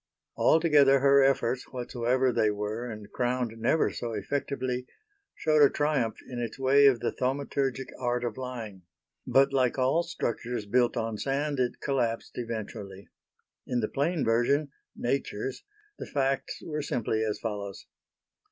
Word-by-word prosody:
Altogether 150 -4 +5
her 140 0 +6
efforts, 130 -2 +1
whatsoever 125 +1 0
they 110 - +3
were 105 +4 -3
and 105 -2 -9
crowned 125 -2 -1
never 160 +7 +2
so 115 -1 -4
effectively, 125 +3 -2 0.5
showed 155 -1 +2
a 140 - +8
triumph 145 -7 0
in 125 -2 -6
its 120 -2 -4
way 135 +1 +5
of 125 -4 +3
the - - 0
thaumaturgic 135 0 -1
art 125 -1 -1
of 120 -3 -2
lying; 120 -7 -6 0.5
but 135 +1 +4
like 130 -2 +2
all 130 +6 +3
structures 120 -8 -3
built 120 +4 +2
on 115 -2 -2
sand 140 +1 -1
it 125 -1 0
collapsed 120 -5 -1
eventually. 105 -4 -6 0.6
In 125 - 0
the 110 - 0
plain 155 +4 0
version 135 +6 +2 0.2
nature's 130 -1 -2 0.4
the - - -6
facts 135 -1 -1
were 150 -2 -3
simply 110 -5 -1
as 110 -1 -1
follows. 100 -3 -5
125 Hz, 145 wpm, -28 LUFS, 115-140 Hz, 0.6 s, a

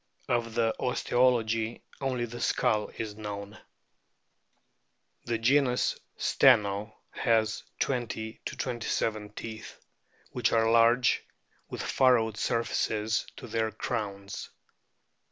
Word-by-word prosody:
Of 115 -1 0
the 115 -1 +2
osteology 120 -3 +1 0.2
only 130 -3 -1
the 120 +1 -8
skull 105 -1 +1
is 110 -2 -4
known. 105 0 -7 1.7
The 120 -1 0
genus 125 +2 +2 0.2
STENO 105 -4 +3 0.2
has 110 -2 +1 0.2
20 115 -3 -2
27 110 -3 -2
teeth, 110 0 -8 0.5
which - - +1
are 115 0 +3
large 115 +2 +4 0.5
with - - -5
furrowed 115 -5 +3
surfaces 110 -1 0
to - - -8
their 110 -1 -1
crowns. 100 -3 -4
115 Hz, 95 wpm, -29 LUFS, 110-120 Hz, 1.7 s, large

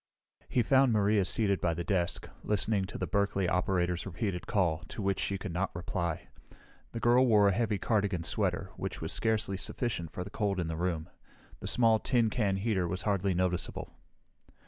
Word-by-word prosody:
He 125 - +2
found 135 +2 +4
Maria 105 -1 +3
seated 100 +2 +1
by 85 -2 +1
the 85 - -3
desk, 90 -2 -1 0.2
listening 105 -1 0
to 100 - -7
the 95 - -2
Berkeley 100 +1 0
operator's 90 -1 0
repeated 95 0 -3
call, 85 -6 +1
to - - -9
which 100 -1 0
she 100 - -1
could 95 -2 -6
not 95 +1 -2
reply. 85 -1 -3 0.6
The 115 - -4
girl 120 +3 +4
wore 105 -3 +5
a - - +2
heavy 105 0 0
cardigan 100 -4 0
sweater, - - -1
which - - -4
was - - -4
scarcely 110 -3 0
sufficient 95 -5 -3
for 90 - -5
the 100 - -10
cold 100 -3 -1
in 85 - -1
the 80 - -2
room. 85 -1 -2 0.5
The - - -6
small, 115 -2 +4
tin 120 -4 +2
can 105 -5 +1
heater 95 -3 0
was 90 +2 -3
hardly 100 -2 +1
noticeable. 90 0 -2
100 Hz, 185 wpm, -31 LUFS, 90-110 Hz, 0.6 s, wore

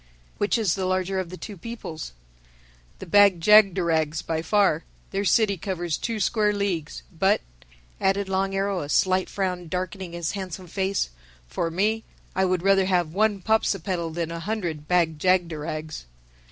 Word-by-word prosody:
"Which 205 +3 +2
is 210 -7 +1
the 190 -2 -2
larger 185 +1 0
of 185 -2 -4
the 185 - -8
two 205 - -8
peoples?" 175 - -7 0.8
"The - - -8
Bag 200 0 +5
jagderags, 170 -5 +4
by 160 -1 -2
far. 180 -2 +2 0.3
Their 195 +1 -1
city 205 0 +3
covers 175 -2 -2
two 230 -2 -3
square 210 +1 +2
leagues. 175 - -2
But," - - +2 0.6
added 195 +1 +1
Long 195 0 0
Arrow 195 -1 0
a 145 - -5
slight 185 +3 +2
frown 180 -3 -2
darkening 185 +1 -4
his 170 -1 -2
handsome 190 -2 -6
face, 190 - -1 0.4
"for 115 - -2
me, 210 +6 0 0.3
I 190 - +2
would 180 -1 0
rather 195 -1 +4
have 175 -4 +1
one 210 0 +1
Popsipetel 190 -6 0
than 170 -1 -2
a 170 - -4
hundred 170 -6 -3
Bag 165 -4 +2
jagderags." 155 - -1
185 Hz, 155 wpm, -25 LUFS, 165-200 Hz, 0.8 s, Bag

